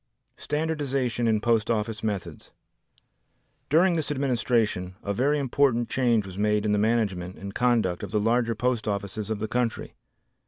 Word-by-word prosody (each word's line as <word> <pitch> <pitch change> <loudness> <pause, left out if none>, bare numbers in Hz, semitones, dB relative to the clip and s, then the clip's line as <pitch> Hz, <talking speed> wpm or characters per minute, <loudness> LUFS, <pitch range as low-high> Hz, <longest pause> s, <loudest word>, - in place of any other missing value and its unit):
Standardization 140 -6 -1
in 110 -1 +2
Post 115 -1 +1
Office 110 -1 -1
Methods 100 -5 -4 1.2
During 170 +4 +4
this 160 -3 -1
administration 120 -9 0
a 100 - -2
very 140 +8 +2
important 130 -3 +1
change 120 -5 +2
was 95 0 -8
made 105 0 +1
in 105 - +1
the 105 - +2
management 100 -5 0
and 100 0 -7
conduct 115 -8 +1
of 100 - -5
the 105 +2 0
larger 115 +2 +1
post 120 -1 -1
offices 100 +1 -3
of 110 - -1
the 110 +1 -3
country. 120 0 -2
115 Hz, 155 wpm, -26 LUFS, 105-125 Hz, 1.2 s, During